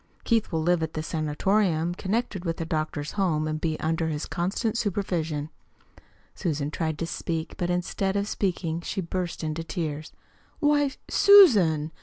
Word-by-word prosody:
Keith 230 -2 +1
will 160 -2 0
live 175 0 +2
at 160 0 -3
the 155 - -2
sanatorium 165 +2 0
connected 195 0 -2
with 165 -2 -2
the 165 - -3
doctor's 155 -2 -2
home 165 -6 0
and 155 0 -3
be 160 -2 -1
under 160 +1 0
his 150 -1 -3
constant 200 +6 -1
supervision." 170 -8 -2 0.8
Susan 150 -5 -2
tried 160 -1 -2
to 165 - -2
speak, 165 0 -4
but 175 - -2
instead 185 +2 -1
of 200 0 0
speaking 170 -5 -2
she 180 - -4
burst 180 -1 -3
into 155 +1 -3
tears. 160 -2 -4 0.5
"Why, 290 -2 +3 0.2
Susan!" 200 - +6
165 Hz, 155 wpm, -26 LUFS, 155-195 Hz, 0.8 s, Susan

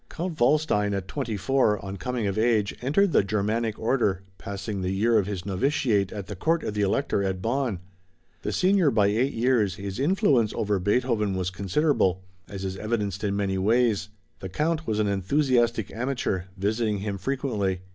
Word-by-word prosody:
Count 170 -1 -5
Waldstein 120 -6 +2
at 95 -1 -4
twenty 120 -3 -3
four, 125 0 +2
on 95 0 -5
coming 120 +4 -3
of 100 -1 -1
age, 110 -2 +1
entered 160 +10 +2
the 135 - +4
Germanic 105 +2 -1
order, 110 -6 0 0.2
passing 100 0 -5
the 90 - -1
year 110 +4 +3
of 100 - -1
his 95 -4 -4
novitiate 100 -1 +1
at 100 -3 -6
the 100 - -7
Court 160 - 0
of 105 - -3
the 105 - -1
Elector 100 +2 +1
at 95 -1 -1
Bonn. 120 0 -1 0.6
The 105 - -3
senior 185 - +3
by 110 -5 +3
eight 125 +7 +1
years, 115 -5 +2
his 100 +1 -6
influence 140 - +2
over 105 -2 0
Beethoven 105 0 +1
was 90 -1 -2
considerable, 95 - +1 0.3
as 95 -1 -6
is 95 0 -4
evidenced 105 -2 -2
in 100 -1 0
many 95 -1 -1
ways. 110 0 +2 0.3
The 95 - -6
Count 155 - -1
was 110 - 0
an 105 - +2
enthusiastic 120 +3 +1
amateur, 120 -7 -2
visiting 105 +2 0
him 100 -1 -3
frequently. 105 -6 -1
105 Hz, 175 wpm, -26 LUFS, 100-130 Hz, 0.6 s, the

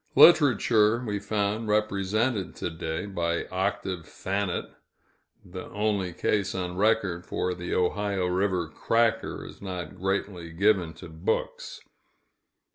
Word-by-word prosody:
Literature 120 -7 +6
we 105 -2 -2
found 105 +2 -1
represented 105 0 0
to - - -3
day, 80 +2 -4
by 85 -4 -1
"Octave 95 -2 -2
Thanet" 95 -1 -2 0.8
the 90 +1 -7
only 105 -3 0
case 100 +3 0
on 90 -1 -3
record, 100 -4 +1
for 90 - -2
the 90 0 -4
Ohio 95 +1 0
River 90 -1 0
"cracker" 115 +8 0
is - - -11
not 90 -5 -5
greatly 95 -3 -2
given 90 -3 +2
to 80 - -10
books. 80 0 -3
95 Hz, 120 wpm, -27 LUFS, 90-105 Hz, 0.8 s, Literature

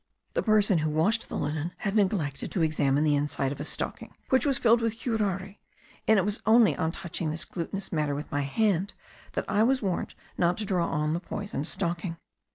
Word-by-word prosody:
The - - +1
person 210 -5 +3
who 155 0 0
washed 200 +10 +1
the - - -3
linen 155 +3 -2
had 200 0 -2
neglected 185 -9 0
to 180 - +1
examine 145 -2 +2
the 150 -1 +3
inside 145 -2 0
of 140 - -6
a - - -3
stocking, - - -4
which 260 +2 +3
was 275 -3 +2
filled 235 0 +4
with 225 -1 -1
curare; 200 -5 -2 0.5
and 220 - +6
it 190 - +3
was 210 +1 -2
only 225 0 +5
on 160 -1 0
touching 170 -2 -3
this 155 +2 -2
glutinous 190 +3 -5
matter 150 -4 0
with 150 +3 -6
my 145 -2 0
hand, 195 +6 0 0.4
that - - -2
I 210 - +2
was 255 +2 +3
warned 190 -3 -2 0.2
not 175 0 +3
to 215 - -2
draw 180 -4 +1
on 150 0 0
the 170 - 0
poisoned 195 -5 -4
stocking. 170 -2 -2
180 Hz, 205 wpm, -28 LUFS, 155-210 Hz, 0.5 s, and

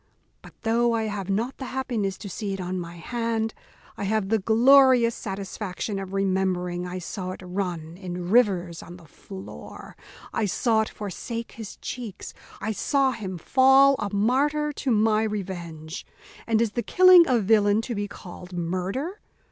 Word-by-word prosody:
But, - - -16
though 235 +1 +2
I 225 -1 0
have 205 -3 -4
not 225 +7 -1
the 265 - -6
happiness 235 -8 -2
to 205 - -8
see 200 +1 -4
it 195 - -5
on 185 0 -3
my 170 0 -7
hand, 225 +4 -2 0.4
I 200 - -3
have 210 -1 0
the 225 0 +2
glorious 245 +2 +5
satisfaction 195 -1 -5
of 190 -1 -6
remembering 185 -2 0
I 180 +1 -5
saw 185 +1 -5
it 185 - -11
run 180 -3 -4
in 180 -2 -5
rivers 190 -8 +2
on 175 +1 -11
the 170 - -16
floor; 95 - -11 0.4
I 225 - 0
saw 220 +3 +2
it 220 - -2
forsake 230 +3 -6
his 220 -3 -8
cheeks, 230 -6 -7 0.3
I 220 - -2
saw 270 +5 +1
him 195 -6 -5
fall 265 +8 +5
a 200 - -3
martyr 285 +8 +1
to 275 - -3
my 215 -1 +3
revenge. 175 -6 -5 0.4
And 225 0 +3
is 225 - -1
the 240 - -1
killing 365 - +7
a 255 - +3
villain 210 0 +3
to 240 - -4
be 205 -1 -2
called 180 -2 -11
murder? 185 - -3
205 Hz, 165 wpm, -25 LUFS, 185-235 Hz, 0.4 s, killing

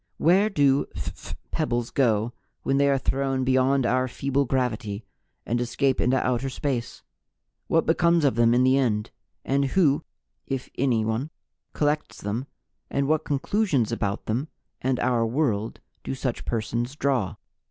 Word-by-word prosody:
"Where 190 +6 +4
do 140 -7 +3
phph - - -6 0.2
pebbles 120 -7 -1
go 115 -3 +1 0.3
when 135 - +1
they 140 0 +4
are 140 - +3
thrown 135 0 0
beyond 130 +1 +3
our 130 +1 +2
feeble 140 +2 0
gravity 115 -5 -2 0.4
and 120 +1 0
escape 130 +2 +1
into 130 +2 +3
outer 130 +1 0
space? 130 -3 -3 0.6
What 165 - +2
becomes 170 -1 +3
of 140 - +4
them 120 +1 +4
in 125 - +4
the 130 +1 +4
end? 105 -5 0 0.3
And 140 +1 +2
who, 150 0 +2 0.4
if 135 -2 -4
anyone, 115 +1 0 0.4
collects 150 0 -1
them, 110 +7 -3 0.4
and 140 0 0
what 155 +1 +1
conclusions 145 - +1
about 100 -3 -2
them 125 +8 -1 0.3
and 130 -1 0
our 120 -2 +2
world 115 -3 -1 0.2
do 135 - -3
such 130 -2 -3
persons 120 +3 -2
draw?" 135 -9 0
130 Hz, 145 wpm, -25 LUFS, 120-140 Hz, 0.6 s, Where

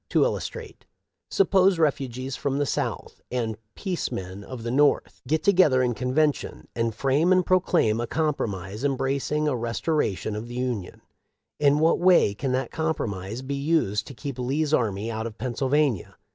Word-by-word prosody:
To - - +3
illustrate: - - -4 0.4
suppose 195 - +4
refugees 135 -4 -1
from 140 +1 -2
the 145 - +1
South, - - -3
and 115 -3 -2 0.2
peace 185 -4 -3
men 95 +2 -6
of 120 +2 -8
the 120 - -2
North, 145 +3 +2
get 155 +3 +1
together 175 -10 +4
in 125 -1 +1
convention 135 +5 -1
and 115 -2 -1
frame 140 +8 +2
and 185 -1 +4
proclaim 170 - +2
a 120 - -3
compromise 110 - -2
embracing 140 +2 0
a 145 - +1
restoration 115 - -1
of 110 +2 -5
the 120 - -8
Union; 125 -7 -3 0.6
in 145 -1 +4
what 160 +2 +3
way 175 - +5
can 130 +6 -3
that 130 -1 -1
compromise 115 - -3
be 135 +2 -4
used 140 -8 0
to 135 - -9
keep 130 +4 -6
Lee's 145 +5 0
army 110 -4 0
out 110 +1 -3
of 115 -1 -10
Pennsylvania 130 - 0
130 Hz, 160 wpm, -25 LUFS, 115-150 Hz, 0.6 s, way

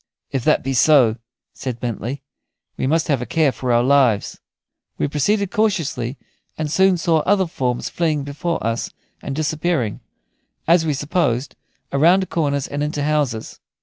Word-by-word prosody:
"If 135 -3 -2
that - - +3
be 135 - -2
so," 125 -4 +5 0.4
said 125 -3 -5
Bentley, 120 +3 -4 0.5
"we - - -2
must 160 +3 +1
have 140 -6 +1
a - - -3
care 155 -4 +2
for 125 +1 -3
our 120 0 +4
lives." 130 -6 +2 0.6
We - - 0
proceeded 190 +8 0
cautiously, 155 - -1 0.4
and 155 -2 -3
soon 190 +1 +4
saw 165 -1 +2
other 190 +4 +2
forms 125 -7 -2
fleeing 155 -4 -1
before 145 +1 -3
us 115 +1 -1 0.3
and 135 - -5
disappearing, 155 - -1 0.7
as 165 0 +4
we 150 - +1
supposed, 140 -3 -1 0.4
around 175 +7 +3
corners 145 -4 0
and 145 +1 -4
into 150 -1 -2
houses. 145 -7 -1
145 Hz, 150 wpm, -20 LUFS, 130-165 Hz, 0.7 s, so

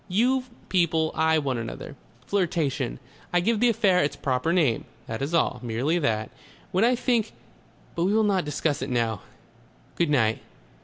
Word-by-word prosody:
You 250 +7 +2 0.2
people 160 -3 +2
eye 160 0 +3
one 135 -5 -1
another.... 115 +5 -7 0.3
Flirtation. 160 - -1 0.3
I 175 - +3
give 215 +5 +1
the 245 +1 +4
affair 195 -5 +3
its 145 - -1
proper 130 +4 0
name. 155 -10 +2 0.2
That 110 +1 -5
is 145 +5 -1
all. 140 -6 +1
Merely 125 +8 0
that. 110 -7 -1 0.4
When 190 +2 +2
I 245 +2 +4
think 240 -3 0 0.6
But 170 - 0
we 195 - +2
will 220 - +4
not 195 -3 +2
discuss 150 0 -1
it - - -3
now.... 115 -5 0 0.7
Good 170 -3 +1
night.... 110 -6 +2
160 Hz, 165 wpm, -26 LUFS, 130-190 Hz, 0.7 s, the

